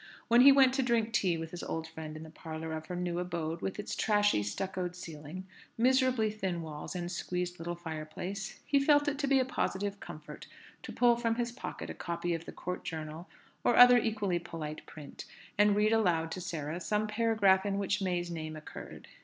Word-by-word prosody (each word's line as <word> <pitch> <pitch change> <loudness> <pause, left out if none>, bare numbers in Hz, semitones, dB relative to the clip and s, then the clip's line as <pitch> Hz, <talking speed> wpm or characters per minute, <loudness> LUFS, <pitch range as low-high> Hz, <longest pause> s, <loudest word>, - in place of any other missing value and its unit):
When 235 +1 +7
he 275 +2 +10
went 270 -2 +6
to 270 - +2
drink 235 -3 +1
tea 180 -5 +2
with 165 0 -6
his 175 - -6
old 160 0 -4
friend 160 -1 -7
in 155 - -8
the 160 - -11
parlour 160 0 -6
of 155 0 -5
her 180 - -4
new 175 -1 -2
abode 170 -2 -3
with 195 - -3
its 210 - -4
trashy, 205 - +3
stuccoed 180 - -3
ceiling, 165 +1 -8 0.3
miserably 255 -2 +3
thin 190 -5 -3
walls, 155 +3 -7
and 175 -1 -3
squeezed 180 0 -3
little 175 +1 -4
fireplace, 175 +4 -6
he 280 - +3
felt 290 0 +4
it 290 -1 -1
to 285 - 0
be 275 0 +4
a 260 - +2
positive 200 -5 -2
comfort - - -9 0.3
to - - -8
pull 240 -1 +4
from 230 -1 0
his 240 0 -1
pocket 245 - -6
a - - -5
copy 170 0 -3
of 165 0 -4
the - - -7
Court 180 0 -5
Journal 160 +2 -6 0.3
or 240 - +3
other 245 0 +9
equally 210 -6 0
polite 160 -3 -6
print, 150 -3 -10 0.3
and 205 0 +4
read 210 +1 +3
aloud 170 -7 +2
to 185 - -4
Sarah 165 -2 -4
some 210 +3 0
paragraph 215 -3 +3
in 200 -1 -1
which 200 0 0
May's 175 -2 -1
name 155 -1 -5
occurred. 155 - -10
180 Hz, 205 wpm, -31 LUFS, 165-220 Hz, 0.3 s, he